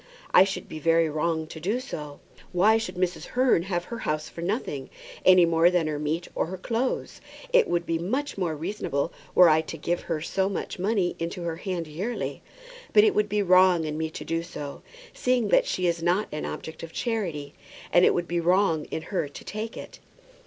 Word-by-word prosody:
I 185 Hz, -, +8 dB
should 190 Hz, -2 st, -4 dB
be 155 Hz, -, -7 dB
very 165 Hz, 0 st, +3 dB
wrong 160 Hz, +1 st, -1 dB
to 160 Hz, 0 st, -9 dB
do 205 Hz, +9 st, -1 dB
so. 150 Hz, -, -7 dB, 0.3 s
Why 210 Hz, +5 st, +4 dB
should 185 Hz, -5 st, -5 dB
Mrs. 180 Hz, 0 st, -1 dB
Hearn 255 Hz, -9 st, +4 dB
have 175 Hz, -1 st, -2 dB
her 235 Hz, +5 st, -7 dB
house 155 Hz, -5 st, -2 dB
for 170 Hz, -, -9 dB
nothing, 170 Hz, -, -3 dB, 0.4 s
any 185 Hz, -2 st, +8 dB
more 165 Hz, +1 st, +4 dB
than 175 Hz, -2 st, +1 dB
her 150 Hz, -1 st, -2 dB
meat 155 Hz, +3 st, -2 dB
or -, -, -1 dB
her 190 Hz, +2 st, -5 dB
clothes? 230 Hz, +7 st, -2 dB, 0.3 s
It -, -, +5 dB
would 175 Hz, 0 st, 0 dB
be 165 Hz, -1 st, -1 dB
much 260 Hz, -, -2 dB
more 175 Hz, -5 st, -1 dB
reasonable 165 Hz, -2 st, -2 dB, 0.2 s
were 180 Hz, -, +8 dB
I 160 Hz, 0 st, +5 dB
to 160 Hz, -, -7 dB
give 175 Hz, 0 st, -1 dB
her 160 Hz, -, -3 dB
so 190 Hz, +4 st, -1 dB
much 195 Hz, -, -4 dB
money 195 Hz, -2 st, +1 dB
into 170 Hz, +1 st, -4 dB
her 165 Hz, -1 st, -3 dB
hand 180 Hz, -2 st, -3 dB
yearly; 180 Hz, +11 st, -4 dB, 0.5 s
but 420 Hz, -, +7 dB
it 430 Hz, -2 st, +4 dB
would 425 Hz, +1 st, +1 dB
be 210 Hz, -1 st, +1 dB
wrong 185 Hz, -2 st, +5 dB
in 150 Hz, -1 st, -3 dB
me 160 Hz, 0 st, -2 dB
to -, -, -8 dB
do 165 Hz, 0 st, -1 dB
so, 150 Hz, -4 st, -7 dB, 0.3 s
seeing 250 Hz, -4 st, +1 dB
that -, -, +4 dB
she 185 Hz, -, -1 dB
is 170 Hz, -1 st, +1 dB
not 175 Hz, +5 st, +1 dB
an 150 Hz, -, -4 dB
object 160 Hz, -, -6 dB
of 165 Hz, -, -8 dB
charity; 170 Hz, -, -3 dB, 0.4 s
and 175 Hz, -, +6 dB
it -, -, +5 dB
would 175 Hz, -1 st, -1 dB
be 175 Hz, 0 st, 0 dB
wrong 170 Hz, -2 st, +2 dB
in 160 Hz, -, -5 dB
her 180 Hz, -3 st, -2 dB
to -, -, -11 dB
take 215 Hz, +2 st, -5 dB
it." -, -, -9 dB
175 Hz, 210 wpm, -26 LUFS, 160-195 Hz, 0.5 s, I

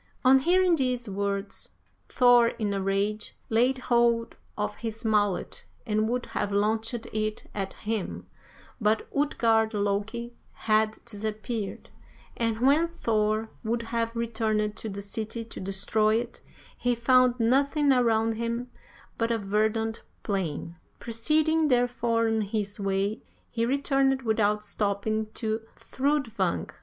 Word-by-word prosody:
"On 265 Hz, +1 st, +7 dB
hearing 355 Hz, +3 st, +3 dB
these 250 Hz, -3 st, -1 dB
words, 200 Hz, 0 st, -3 dB, 0.4 s
Thor, 245 Hz, -2 st, +6 dB
in 215 Hz, -3 st, -2 dB
a 195 Hz, -, -1 dB
rage, 200 Hz, +2 st, -1 dB, 0.2 s
laid 245 Hz, +4 st, +3 dB
hold 235 Hz, -2 st, +2 dB, 0.2 s
of 105 Hz, 0 st, -2 dB
his 225 Hz, 0 st, -5 dB
mallet 205 Hz, -3 st, 0 dB, 0.2 s
and 215 Hz, -1 st, +1 dB
would 245 Hz, 0 st, -1 dB
have 205 Hz, -, -3 dB
launched 220 Hz, +4 st, 0 dB, 0.2 s
it 215 Hz, 0 st, -2 dB
at 195 Hz, -2 st, -3 dB
him, 215 Hz, -2 st, -4 dB, 0.5 s
but 215 Hz, 0 st, +1 dB
Utgard 225 Hz, -6 st, +2 dB
Loki 210 Hz, +4 st, -2 dB, 0.3 s
had 215 Hz, 0 st, +2 dB
disappeared, 215 Hz, -1 st, -5 dB, 0.4 s
and 230 Hz, -1 st, -1 dB
when 290 Hz, +6 st, +4 dB
Thor 220 Hz, -8 st, 0 dB
would 230 Hz, +1 st, -1 dB
have 230 Hz, 0 st, -1 dB
returned 220 Hz, -2 st, -1 dB
to 220 Hz, -, -5 dB
the 200 Hz, 0 st, -5 dB
city 220 Hz, +2 st, -4 dB
to 225 Hz, -, -9 dB
destroy 205 Hz, +3 st, +2 dB
it, 235 Hz, +1 st, -3 dB, 0.4 s
he 245 Hz, 0 st, +1 dB
found 250 Hz, +1 st, +4 dB
nothing 280 Hz, +5 st, +3 dB
around 225 Hz, -3 st, +2 dB
him 235 Hz, +2 st, -3 dB, 0.5 s
but 230 Hz, 0 st, +1 dB
a 230 Hz, -, +2 dB
verdant 220 Hz, +2 st, 0 dB, 0.2 s
plain. 175 Hz, -4 st, -3 dB, 0.2 s
Proceeding, 310 Hz, +7 st, +1 dB
therefore, 240 Hz, -3 st, +2 dB
on 225 Hz, 0 st, +1 dB
his 205 Hz, 0 st, -3 dB
way, 195 Hz, +2 st, -1 dB, 0.3 s
he 230 Hz, 0 st, 0 dB
returned 270 Hz, 0 st, +1 dB
without 210 Hz, -2 st, +1 dB
stopping 210 Hz, +1 st, -1 dB
to 220 Hz, -1 st, -2 dB
Thrudvang. 275 Hz, -4 st, -1 dB
225 Hz, 125 wpm, -27 LUFS, 210-245 Hz, 0.5 s, On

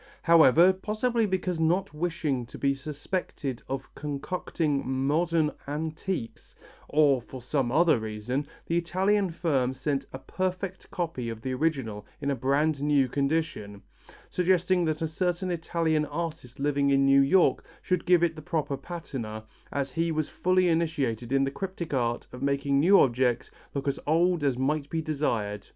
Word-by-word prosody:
However, 170 Hz, +2 st, +6 dB
possibly 215 Hz, +4 st, 0 dB
because 185 Hz, -3 st, -1 dB
not 165 Hz, +1 st, +1 dB
wishing 150 Hz, -6 st, -2 dB
to -, -, -10 dB
be 140 Hz, 0 st, +2 dB
suspected 140 Hz, -1 st, -4 dB
of 135 Hz, 0 st, -5 dB
concocting 150 Hz, 0 st, -2 dB, 0.2 s
"modern 160 Hz, +1 st, +2 dB, 0.2 s
antiques," 155 Hz, -2 st, -4 dB, 0.3 s
or 145 Hz, -4 st, +4 dB
for 130 Hz, +2 st, -10 dB
some 125 Hz, 0 st, -1 dB
other 160 Hz, -2 st, +4 dB
reason, 110 Hz, +6 st, -3 dB, 0.2 s
the 170 Hz, -, 0 dB
Italian 190 Hz, +3 st, +1 dB
firm 140 Hz, -7 st, 0 dB
sent 135 Hz, 0 st, -2 dB
a -, -, -6 dB
perfect 185 Hz, +5 st, -4 dB
copy 160 Hz, -10 st, -3 dB
of 115 Hz, -1 st, -7 dB
the 130 Hz, -, -2 dB
original 130 Hz, -8 st, -1 dB, 0.2 s
in 140 Hz, -1 st, -1 dB
a -, -, 0 dB
brand 140 Hz, +4 st, +1 dB
new 145 Hz, -2 st, +3 dB
condition, 140 Hz, -7 st, -2 dB, 0.5 s
suggesting 180 Hz, 0 st, +2 dB
that 155 Hz, 0 st, -1 dB
a -, -, +1 dB
certain 180 Hz, +3 st, -1 dB
Italian 165 Hz, -2 st, 0 dB
artist 150 Hz, -5 st, -5 dB
living 140 Hz, 0 st, +1 dB
in 135 Hz, 0 st, +4 dB
New 135 Hz, 0 st, +6 dB
York 170 Hz, +7 st, +3 dB, 0.2 s
should 180 Hz, -1 st, 0 dB
give 175 Hz, -1 st, +5 dB
it 165 Hz, -2 st, +1 dB
the 155 Hz, -, -8 dB
proper 150 Hz, -4 st, -2 dB
patina 135 Hz, -9 st, -6 dB, 0.3 s
as 140 Hz, -1 st, -2 dB
he 165 Hz, +4 st, 0 dB
was 155 Hz, -1 st, -1 dB
fully 185 Hz, 0 st, +2 dB
initiated 145 Hz, -9 st, 0 dB
in 135 Hz, 0 st, +3 dB
the 135 Hz, -, 0 dB
cryptic 180 Hz, -1 st, -5 dB
art 120 Hz, -2 st, 0 dB
of 125 Hz, -, -9 dB
making 140 Hz, 0 st, +1 dB
new 190 Hz, +7 st, +6 dB
objects 125 Hz, -1 st, +2 dB, 0.2 s
look 140 Hz, 0 st, -3 dB
as 140 Hz, -, 0 dB
old 170 Hz, +1 st, +2 dB
as 135 Hz, -3 st, +1 dB
might 145 Hz, +2 st, -1 dB
be 165 Hz, -, -1 dB
desired. 115 Hz, -10 st, -2 dB
150 Hz, 160 wpm, -27 LUFS, 135-170 Hz, 0.5 s, However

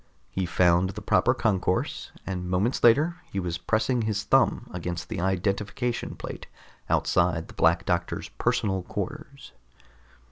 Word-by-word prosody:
He 95 Hz, -1 st, -1 dB
found 90 Hz, +1 st, +3 dB
the 105 Hz, +2 st, -7 dB
proper 125 Hz, +5 st, +3 dB
concourse, 95 Hz, -6 st, 0 dB, 0.2 s
and 90 Hz, -2 st, -4 dB
moments 95 Hz, +7 st, 0 dB
later 150 Hz, +9 st, +5 dB
he 100 Hz, -, -2 dB
was 85 Hz, -2 st, -3 dB
pressing 115 Hz, +4 st, +1 dB
his 105 Hz, -2 st, -1 dB
thumb -, -, +3 dB
against 90 Hz, -1 st, -4 dB
the 110 Hz, -4 st, -3 dB
identification 100 Hz, +6 st, -1 dB
plate -, -, -8 dB, 0.4 s
outside 85 Hz, -2 st, +2 dB
the -, -, -11 dB
Black -, -, +3 dB
Doctor's -, -, -1 dB
personal 95 Hz, -2 st, 0 dB
quarters. 140 Hz, -, -6 dB
95 Hz, 135 wpm, -26 LUFS, 90-115 Hz, 0.4 s, later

